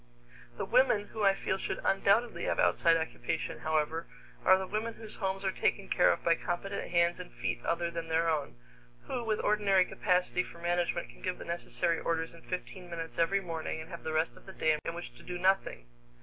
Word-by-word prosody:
The - - -2
women 240 -5 +3
who 220 - -5
I 195 -1 +5
feel 190 0 -1
should - - -3
undoubtedly 200 +4 +2
have - - 0
outside 165 0 +4
occupation, 160 0 -3
however, 155 +1 0 0.4
are 190 - +7
the 190 - -3
women 220 +4 -3
whose 220 -1 -8
homes 195 -1 -2
are 190 - +2
taken 195 +1 0
care 180 - +5
of - - -2
by 170 - +5
competent 175 +4 -3
hands 170 0 +3
and 180 - -8
feet 120 0 -3
other 170 0 0
than 165 -1 -4
their 165 +1 +2
own, 150 - -1 0.5
who 245 - -3
with 215 -2 0
ordinary 200 -3 +4
capacity 180 -2 +1
for 175 - -9
management 175 0 0
can - - -15
give 185 -1 -2
the - - -8
necessary 170 0 -1
orders 165 0 -1
in 165 - -14
fifteen 180 0 -6
minutes 165 -1 -6
every 195 +4 +3
morning 165 -3 -4
and 160 +3 -9
have 170 - -7
the 160 - -3
rest 160 +1 +1
of - - -17
the 190 - -8
day 155 -3 +2
in 165 - -4
which 170 -8 -7
to - - -14
do 180 - -5
nothing. 185 - +1
175 Hz, 210 wpm, -31 LUFS, 165-195 Hz, 0.5 s, are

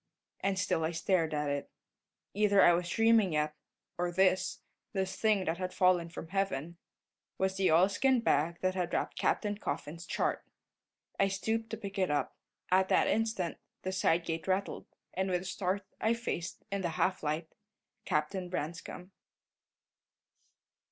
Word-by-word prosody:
And 195 -1 0
still 185 -3 +1
I 160 - +1
stared 165 -1 +1
at 150 -1 -1
it. 140 0 -3 0.6
Either 205 -1 +4
I 175 - +7
was 175 0 -1
dreaming 225 -3 +4
yet, 150 0 +1 0.5
or 175 0 0
this 185 +1 +2 0.3
this 190 -1 -1
thing 210 -4 +2
that 165 +1 -1
had 185 0 -4
fallen 180 -2 +3
from 165 -1 -8
heaven 175 -4 -2 0.6
was 190 0 0
the 190 -3 +2
oilskin 200 +10 +4
bag 170 -5 +2
that 185 0 +1
had 180 -2 -2
wrapped - - -1
Captain 205 -1 0
Coffin's 160 +3 -5
chart. - - -1 0.8
I 195 - +5
stooped 220 +3 -2
to 225 - -4
pick 200 -2 -6
it 185 - +2
up. 145 0 -1 0.4
At 190 +1 +4
that - - +4
instant 220 -6 0 0.2
the 185 - -2
side 175 -3 +2
gate 165 -1 -3
rattled, 190 +1 -1 0.3
and 190 +1 -1
with 180 -1 0
a - - -10
start 190 +1 -2
I 225 +1 +2
faced, 185 -7 -4
in 200 -1 -1
the 175 - -1
half 185 0 +1
light 155 +2 -2 0.5
Captain 175 +4 -1
Branscome. 175 +2 -5
185 Hz, 160 wpm, -32 LUFS, 170-195 Hz, 0.8 s, I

